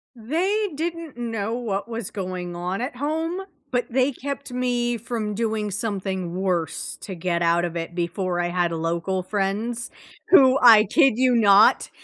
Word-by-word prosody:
They 365 Hz, -, -1 dB
didn't 330 Hz, -2 st, -4 dB
know 225 Hz, -3 st, -3 dB
what 220 Hz, -4 st, -3 dB
was 230 Hz, -3 st, -5 dB
going 180 Hz, -3 st, -5 dB
on 180 Hz, +5 st, -3 dB
at 250 Hz, 0 st, -4 dB
home, 320 Hz, +7 st, -2 dB, 0.3 s
but 245 Hz, -1 st, 0 dB
they 260 Hz, +3 st, +2 dB
kept 280 Hz, 0 st, -6 dB
me 245 Hz, -1 st, 0 dB
from 220 Hz, -2 st, -4 dB
doing 220 Hz, -1 st, -1 dB
something 190 Hz, -4 st, -3 dB
worse 180 Hz, -4 st, -2 dB
to 195 Hz, -, -7 dB
get 170 Hz, 0 st, -1 dB
out 170 Hz, +1 st, +2 dB
of 175 Hz, -1 st, -3 dB
it 165 Hz, +1 st, -5 dB
before 175 Hz, +1 st, -2 dB
I 175 Hz, -, 0 dB
had 175 Hz, -1 st, 0 dB
local 170 Hz, +3 st, -2 dB
friends, 210 Hz, +5 st, -2 dB, 0.4 s
who, 265 Hz, -7 st, +7 dB
I 220 Hz, -3 st, +8 dB
kid 270 Hz, -2 st, +4 dB
you 255 Hz, -1 st, +3 dB
not, 205 Hz, -2 st, +5 dB
215 Hz, 160 wpm, -23 LUFS, 185-250 Hz, 0.4 s, I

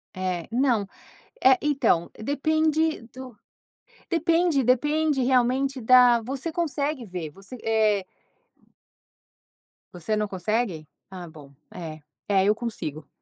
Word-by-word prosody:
Eh, 185 Hz, -2 st, -3 dB
não, 240 Hz, -4 st, +1 dB, 0.6 s
eh, 260 Hz, -1 st, +6 dB
então, 275 Hz, -, +1 dB
depende 315 Hz, +5 st, 0 dB
do 255 Hz, -2 st, -10 dB, 0.7 s
depende 335 Hz, -3 st, +2 dB
depende 295 Hz, +3 st, +1 dB
realmente 260 Hz, +2 st, +1 dB
da 245 Hz, 0 st, +6 dB
você 270 Hz, +7 st, -4 dB
consegue 300 Hz, -5 st, -2 dB
ver. 180 Hz, -6 st, -6 dB
Você 195 Hz, -, -11 dB
é. 215 Hz, -3 st, +2 dB, 1.9 s
Você 180 Hz, +5 st, -2 dB
não 210 Hz, 0 st, -1 dB
consegue? 190 Hz, -3 st, -2 dB, 0.2 s
Ah 185 Hz, -2 st, -8 dB
bom, 150 Hz, -4 st, -14 dB, 0.2 s
é 160 Hz, -3 st, -8 dB, 0.3 s
é 195 Hz, -2 st, +3 dB
eu 210 Hz, -, +4 dB
consigo 165 Hz, -, -5 dB
240 Hz, 110 wpm, -25 LUFS, 190-280 Hz, 1.9 s, eh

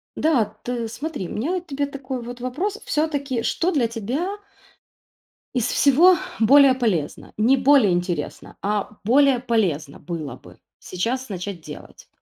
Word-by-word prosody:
Да, 300 Hz, -8 st, +2 dB, 0.2 s
ты 240 Hz, -2 st, -3 dB
смотри, 285 Hz, -, -5 dB
у -, -, -6 dB
меня 255 Hz, +11 st, -2 dB
вот 360 Hz, -1 st, -3 dB
к -, -, -40 dB
тебе 285 Hz, -1 st, -1 dB
такой 265 Hz, -2 st, -6 dB
вот 245 Hz, +1 st, -8 dB
вопрос. 350 Hz, -, -3 dB
Всё-таки, 280 Hz, -6 st, -1 dB
что 360 Hz, +3 st, 0 dB
для 255 Hz, -7 st, +2 dB
тебя 265 Hz, -, -3 dB, 1.2 s
из 245 Hz, -3 st, +1 dB
всего 320 Hz, +9 st, +5 dB, 0.2 s
более 270 Hz, +3 st, +6 dB
полезно? 205 Hz, -, -2 dB
Не 245 Hz, +6 st, +4 dB
более 260 Hz, -5 st, +5 dB
интересно, 175 Hz, -3 st, -3 dB
а 210 Hz, +1 st, -2 dB
более 265 Hz, +3 st, +4 dB
полезно 185 Hz, -, -1 dB
было 155 Hz, -7 st, -6 dB
бы -, -, -17 dB, 0.2 s
сейчас 245 Hz, +8 st, -3 dB
начать 185 Hz, -2 st, -5 dB
делать? 150 Hz, -1 st, -11 dB
245 Hz, 145 wpm, -22 LUFS, 205-285 Hz, 1.2 s, более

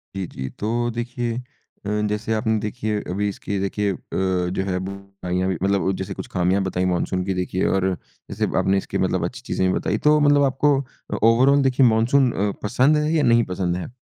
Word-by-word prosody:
जी, 95 Hz, -1 st, -2 dB
जी। 65 Hz, 0 st, -6 dB
तो 120 Hz, +3 st, 0 dB
देखिए 120 Hz, 0 st, -3 dB, 0.5 s
अ, -, -, -3 dB, 0.2 s
जैसे 105 Hz, +2 st, -2 dB
आपने 110 Hz, 0 st, +1 dB
देखिए 105 Hz, 0 st, -2 dB
अभी 100 Hz, +3 st, -1 dB
इसकी 100 Hz, 0 st, -4 dB
देखिए 100 Hz, +1 st, -1 dB
अ, -, -, -5 dB, 0.6 s
जो 95 Hz, -, +1 dB
है 90 Hz, -1 st, 0 dB
बुराइयाँ 100 Hz, -2 st, -4 dB
भी 90 Hz, -, -1 dB
मतलब 100 Hz, -1 st, +2 dB
जैसे 95 Hz, +1 st, -4 dB
कुछ -, -, -7 dB
ख़ामियाँ 95 Hz, +2 st, +1 dB
बताई 95 Hz, -1 st, -1 dB
मानसून 90 Hz, +1 st, 0 dB
की 95 Hz, -, -1 dB
देखिए 90 Hz, +1 st, -1 dB
और 95 Hz, -1 st, +1 dB, 0.4 s
जैसे -, -, -1 dB
आपने 95 Hz, +1 st, +2 dB
इसके -, -, -3 dB
मतलब -, -, 0 dB
अच्छी -, -, -6 dB
चीज़ें 95 Hz, -, -1 dB
भी 95 Hz, -, +1 dB
बताई, -, -, -1 dB
तो 150 Hz, 0 st, +4 dB
मतलब 145 Hz, -1 st, +4 dB
आपको 135 Hz, +1 st, +2 dB
अ, 130 Hz, -, -9 dB
ओवरऑल 130 Hz, +5 st, +5 dB
देखिए 130 Hz, 0 st, +4 dB
मानसून 120 Hz, +3 st, +3 dB
अ, 100 Hz, +1 st, 0 dB
पसंद 130 Hz, +8 st, +3 dB
है? 150 Hz, +1 st, 0 dB
या 155 Hz, -, +2 dB
नहीं 115 Hz, 0 st, +4 dB
पसंद 90 Hz, -1 st, -1 dB
है? 90 Hz, -, -5 dB
105 Hz, 200 wpm, -22 LUFS, 95-120 Hz, 0.6 s, ओवरऑल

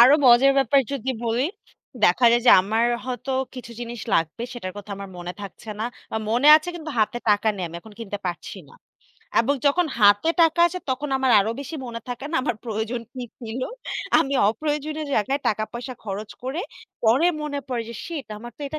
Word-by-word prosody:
আরো 255 Hz, +4 st, +9 dB
মজার 250 Hz, +3 st, +7 dB
ব্যাপার 275 Hz, 0 st, +4 dB
যদি 265 Hz, -1 st, -2 dB
বলি 235 Hz, +3 st, +1 dB, 0.6 s
দেখা 210 Hz, +8 st, +4 dB
যায় 240 Hz, 0 st, +3 dB
যে -, -, +9 dB
আমার 220 Hz, +4 st, +1 dB, 0.2 s
হয়তো 255 Hz, +1 st, -4 dB, 0.2 s
কিছু 245 Hz, -2 st, -8 dB
জিনিস 240 Hz, -1 st, -6 dB
লাগবে 165 Hz, +8 st, 0 dB
সেটার 185 Hz, -7 st, -6 dB
কথা 205 Hz, 0 st, -9 dB
আমার 200 Hz, 0 st, -7 dB
মনে 175 Hz, 0 st, -5 dB
থাকছে 200 Hz, +2 st, -9 dB
না। -, -, 0 dB, 0.3 s
বা -, -, -1 dB
মনে 250 Hz, +6 st, +4 dB
আছে 315 Hz, +3 st, -4 dB
কিন্তু 315 Hz, -2 st, -6 dB
হাতে 220 Hz, +3 st, +1 dB
টাকা 210 Hz, +1 st, +3 dB
নেই 185 Hz, -, -4 dB
আমি 170 Hz, -, -8 dB
এখন 220 Hz, +2 st, -14 dB
কিনতে 205 Hz, -2 st, -5 dB
পারছি 175 Hz, -1 st, -5 dB
না। -, -, -17 dB, 0.7 s
এবং 275 Hz, +5 st, +1 dB
যখন 345 Hz, +4 st, +3 dB
হাতে 205 Hz, +9 st, +5 dB
টাকা 330 Hz, +1 st, +3 dB
আসে 365 Hz, +1 st, -3 dB
তখন 275 Hz, +3 st, -2 dB
আমার 260 Hz, -1 st, +2 dB
আরো 215 Hz, -, 0 dB
বেশি 280 Hz, +3 st, -7 dB
মনে 230 Hz, -1 st, -6 dB
থাকে 245 Hz, +2 st, -5 dB
না 330 Hz, -, 0 dB
আমার 245 Hz, -5 st, -1 dB
প্রয়োজন 225 Hz, +1 st, -3 dB
কি 255 Hz, -, -5 dB, 0.2 s
ছিল। 230 Hz, +2 st, -5 dB, 0.6 s
আমি 275 Hz, -, +1 dB, 0.2 s
অপ্রয়োজনীয় 300 Hz, +5 st, -2 dB
জায়গায় 270 Hz, +7 st, +1 dB
টাকা 215 Hz, 0 st, 0 dB
পয়সা 250 Hz, +2 st, -6 dB
খরচ 205 Hz, +1 st, -5 dB
করে 270 Hz, +7 st, -3 dB, 0.4 s
পরে 240 Hz, +9 st, +4 dB, 0.2 s
মনে 285 Hz, -1 st, -3 dB
পড়ে 245 Hz, -2 st, -1 dB
যে 235 Hz, -, -7 dB
শিট 320 Hz, -5 st, -5 dB
আমার 240 Hz, +2 st, -9 dB
তো -, -, -22 dB
এটা 310 Hz, -, -5 dB
240 Hz, 200 wpm, -24 LUFS, 220-280 Hz, 0.7 s, আরো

